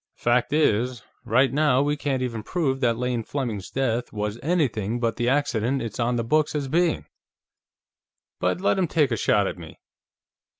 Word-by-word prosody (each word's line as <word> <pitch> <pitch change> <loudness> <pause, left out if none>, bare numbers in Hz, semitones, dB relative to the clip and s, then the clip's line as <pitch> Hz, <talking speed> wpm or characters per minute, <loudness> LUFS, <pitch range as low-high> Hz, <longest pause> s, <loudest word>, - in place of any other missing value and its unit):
Fact 120 +1 +1
is, 125 -5 +1 0.2
right 130 +2 +3
now 145 -3 +3
we 145 +1 0
can't 135 -3 -1
even 115 -3 -3
prove 135 - -1
that 120 -3 +1
Lane 125 -1 -1
Fleming's 115 -6 -4
death 125 -3 -1
was 105 +1 -3
anything 120 - 0
but 115 -2 0
the 120 0 +1
accident 135 -2 +1
it's 115 +1 -6
on 120 +1 +1
the 115 - 0
books 150 +6 +1
as 145 -2 -1
being. 170 +4 +1 1.3
But - - 0
let 195 - +2
him 180 - +2
take 150 -4 +2
a - - +2
shot 105 -1 +2
at 90 - -4
me...." 80 -3 -11
125 Hz, 175 wpm, -24 LUFS, 115-145 Hz, 1.3 s, right